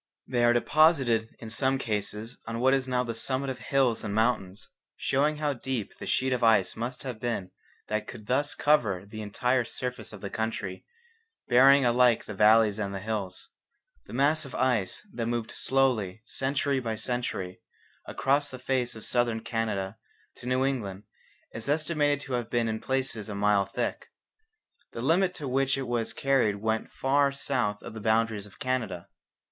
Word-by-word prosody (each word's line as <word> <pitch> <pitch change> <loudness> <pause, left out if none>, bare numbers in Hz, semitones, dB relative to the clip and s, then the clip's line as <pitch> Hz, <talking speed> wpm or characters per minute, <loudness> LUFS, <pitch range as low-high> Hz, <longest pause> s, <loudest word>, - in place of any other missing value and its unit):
They 120 -2 0
are 120 - +6
deposited 120 -4 +3
in 110 -1 -9
some 130 +3 +1
cases 110 -1 -4
on 115 0 -3
what 130 +2 +4
is 135 -1 +1
now 125 -1 +1
the 115 -2 -3
summit 130 +4 -1
of 130 - -7
hills 130 -5 +1
and 105 -1 -3
mountains, 110 -4 0 0.3
showing 150 +3 +1
how 150 -1 0
deep 125 -4 -4
the - - -6
sheet 130 0 +1
of 125 -1 -1
ice 110 -5 +4
must 120 +4 -4
have 125 -5 -5
been 115 -6 -3 0.4
that 110 0 -2
could 110 -4 -9
thus 140 +5 0
cover 105 -11 +2
the 110 +2 -8
entire 125 +5 +1
surface 125 +2 -5
of 105 -3 -10
the 100 - -5
country, 105 -4 -3 0.6
burying 135 +2 +6
alike 120 -1 +4
the 105 - -6
valleys 110 +1 +5
and 100 -2 -2
the - - -3
hills. 100 -3 -4 0.6
The 105 - -10
mass 145 +5 +3
of 135 - -8
ice 125 - 0
that 115 -2 -2
moved 120 0 -2
slowly, 115 -7 0
century 135 +2 0
by 115 -3 -3
century, 110 -6 -3 0.5
across 140 +2 +1
the 130 - -7
face 130 -2 -1
of 110 - -9
Southern 120 -2 +1
Canada 110 -4 -2 0.4
to 120 - -9
New 130 +1 +2
England 105 -8 -3 0.5
is 110 +4 -5
estimated 145 -1 +1
to 135 - -6
have 120 -2 -1
been 120 -1 +1
in 110 0 -2
places 130 -5 -2
a 105 - -4
mile 100 -1 +3
thick. 100 - -3 0.9
The 115 - -5
limit 180 +5 +2
to 145 - -5
which 135 +1 +1
it 135 -2 -3
was 120 -2 -1
carried 135 -7 +2
went 110 +2 -2
far 140 +1 +2
south 125 -7 -1
of - - -8
the 110 - -7
boundaries 110 -1 +1
of 95 - -18
Canada. 110 -9 -2
120 Hz, 175 wpm, -28 LUFS, 110-135 Hz, 0.9 s, are